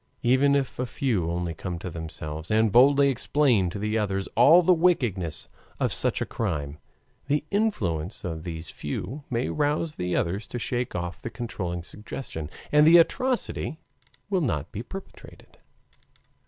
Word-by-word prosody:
Even 130 Hz, +3 st, +4 dB
if 135 Hz, -3 st, -1 dB
a 125 Hz, -, -1 dB
few 110 Hz, -11 st, 0 dB
only 85 Hz, 0 st, -2 dB
come 90 Hz, +2 st, -5 dB
to 90 Hz, +1 st, -6 dB
themselves, 80 Hz, -1 st, -6 dB
and 110 Hz, 0 st, +3 dB
boldly 140 Hz, +4 st, +6 dB
explain 125 Hz, -6 st, +2 dB
to 90 Hz, -, -6 dB
the 105 Hz, +2 st, 0 dB
others 95 Hz, -2 st, -1 dB
all 155 Hz, +10 st, +7 dB
the 180 Hz, -, +6 dB
wickedness 110 Hz, -, +1 dB, 0.3 s
of -, -, +1 dB
such -, -, -1 dB
a -, -, +1 dB
crime, 75 Hz, -9 st, -3 dB, 0.5 s
the 145 Hz, +1 st, +1 dB
influence 105 Hz, -, -1 dB
of 80 Hz, -3 st, -4 dB
these 80 Hz, -2 st, -6 dB
few 135 Hz, +11 st, -5 dB
may 120 Hz, 0 st, 0 dB
rouse 150 Hz, +1 st, 0 dB
the 90 Hz, 0 st, -1 dB
others 95 Hz, +5 st, -1 dB
to -, -, -5 dB
shake 120 Hz, +1 st, -2 dB
off 85 Hz, -1 st, -4 dB
the -, -, -4 dB
controlling 90 Hz, -8 st, -4 dB
suggestion, 90 Hz, -, -7 dB, 0.2 s
and 150 Hz, +1 st, +6 dB
the 170 Hz, +2 st, +9 dB
atrocity 240 Hz, -2 st, +1 dB, 0.5 s
will 195 Hz, -3 st, +1 dB
not 75 Hz, -, -1 dB
be 105 Hz, -, -5 dB
perpetrated. 190 Hz, +10 st, -11 dB
110 Hz, 155 wpm, -26 LUFS, 85-140 Hz, 0.5 s, the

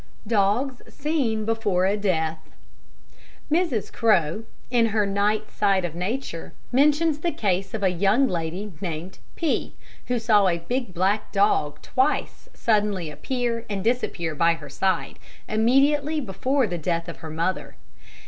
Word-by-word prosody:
Dogs 225 Hz, +5 st, +1 dB
seen 270 Hz, -8 st, -1 dB
before 210 Hz, -5 st, +1 dB
a 195 Hz, +2 st, +2 dB
Death 165 Hz, -6 st, 0 dB, 1.1 s
Mrs. 315 Hz, -, 0 dB
Crowe, 210 Hz, -2 st, +2 dB, 0.3 s
in 235 Hz, -2 st, +4 dB
her 215 Hz, -1 st, +1 dB
Night 200 Hz, +2 st, 0 dB
Side 195 Hz, -3 st, +2 dB
of 170 Hz, -, -4 dB
Nature, 180 Hz, 0 st, -4 dB, 0.2 s
mentions 295 Hz, +4 st, +3 dB
the 340 Hz, +2 st, 0 dB
case 195 Hz, -, -1 dB
of 210 Hz, -, -4 dB
a 190 Hz, -, +4 dB
young 195 Hz, +9 st, +3 dB
lady 180 Hz, +2 st, -3 dB
named 175 Hz, 0 st, -5 dB, 0.2 s
P, 325 Hz, -4 st, -1 dB, 0.3 s
who 250 Hz, -, +1 dB
saw 215 Hz, -4 st, +4 dB
a 170 Hz, -2 st, +2 dB
big 240 Hz, +6 st, -3 dB
black 195 Hz, +4 st, +1 dB
dog 175 Hz, -8 st, +1 dB
twice 265 Hz, +4 st, 0 dB
suddenly 205 Hz, -7 st, +1 dB
appear 240 Hz, -, -2 dB
and 195 Hz, -2 st, -3 dB
disappear 210 Hz, -8 st, -1 dB
by 165 Hz, +2 st, +3 dB
her -, -, -11 dB
side, 190 Hz, -1 st, -1 dB, 0.3 s
immediately 280 Hz, +7 st, +3 dB
before 255 Hz, +4 st, 0 dB
the 175 Hz, -5 st, -3 dB
death 170 Hz, +1 st, -1 dB
of 170 Hz, -, -7 dB
her 160 Hz, -, -8 dB
mother. 165 Hz, +4 st, -2 dB
210 Hz, 140 wpm, -24 LUFS, 180-245 Hz, 1.1 s, in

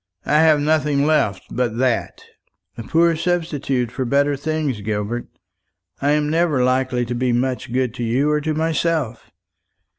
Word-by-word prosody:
I 150 Hz, -, +3 dB
have 155 Hz, -2 st, +5 dB
nothing 150 Hz, -1 st, +1 dB
left 125 Hz, -11 st, +1 dB
but 120 Hz, -2 st, -1 dB
that." 125 Hz, -2 st, -1 dB, 0.5 s
"A -, -, -7 dB
poor 165 Hz, +7 st, +2 dB
substitute 155 Hz, -8 st, -1 dB
for 130 Hz, +2 st, -3 dB
better 140 Hz, +3 st, +2 dB
things, 145 Hz, -5 st, -2 dB
Gilbert. 105 Hz, +3 st, -3 dB, 0.7 s
I 145 Hz, +1 st, +2 dB
am 150 Hz, 0 st, +1 dB
never 155 Hz, -4 st, +1 dB
likely 130 Hz, -1 st, +1 dB
to 120 Hz, -, -4 dB
be 125 Hz, +1 st, 0 dB
much 125 Hz, 0 st, -1 dB
good 125 Hz, -2 st, 0 dB
to 120 Hz, -, -5 dB
you 130 Hz, +6 st, +1 dB
or 150 Hz, 0 st, +1 dB
to 155 Hz, +1 st, -2 dB
myself. 160 Hz, -5 st, -1 dB
140 Hz, 155 wpm, -20 LUFS, 125-155 Hz, 0.7 s, have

